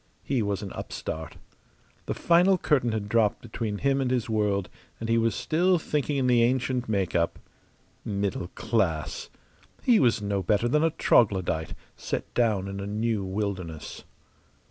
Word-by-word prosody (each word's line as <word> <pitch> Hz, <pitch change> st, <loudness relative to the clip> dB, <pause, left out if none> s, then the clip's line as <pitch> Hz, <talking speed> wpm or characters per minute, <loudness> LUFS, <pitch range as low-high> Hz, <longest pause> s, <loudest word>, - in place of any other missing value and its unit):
He 135 Hz, -4 st, 0 dB
was 100 Hz, -1 st, -2 dB
an 100 Hz, -, -6 dB
upstart. 80 Hz, 0 st, -6 dB, 0.7 s
The -, -, -2 dB
final 180 Hz, +3 st, +4 dB
curtain 135 Hz, -8 st, +1 dB
had 110 Hz, -2 st, -2 dB
dropped 110 Hz, -1 st, +2 dB
between 110 Hz, -2 st, -4 dB
him 135 Hz, +3 st, +1 dB
and 130 Hz, -, 0 dB
his 125 Hz, -3 st, 0 dB
world, 105 Hz, -4 st, 0 dB, 0.3 s
and 115 Hz, -, -4 dB
he 115 Hz, 0 st, +3 dB
was 115 Hz, -2 st, +1 dB
still 170 Hz, +8 st, +2 dB
thinking 150 Hz, -2 st, -1 dB
in 135 Hz, -, +1 dB
the 125 Hz, -2 st, +4 dB
ancient 125 Hz, 0 st, +1 dB
make 95 Hz, -5 st, 0 dB
up. 85 Hz, -1 st, +1 dB, 0.7 s
Middle 100 Hz, -3 st, -2 dB
class! 85 Hz, -, -1 dB, 0.5 s
He 240 Hz, -3 st, +5 dB
was 120 Hz, -4 st, +3 dB
no 100 Hz, -1 st, -1 dB
better 105 Hz, +5 st, +1 dB
than 150 Hz, +6 st, +2 dB
a 165 Hz, -, +4 dB
troglodyte, 95 Hz, -, +2 dB, 0.2 s
set -, -, -4 dB
down 110 Hz, -5 st, +1 dB
in 100 Hz, 0 st, -5 dB
a 100 Hz, -, -4 dB
new 110 Hz, 0 st, -1 dB
wilderness. 95 Hz, -5 st, -4 dB
110 Hz, 160 wpm, -27 LUFS, 100-125 Hz, 0.7 s, He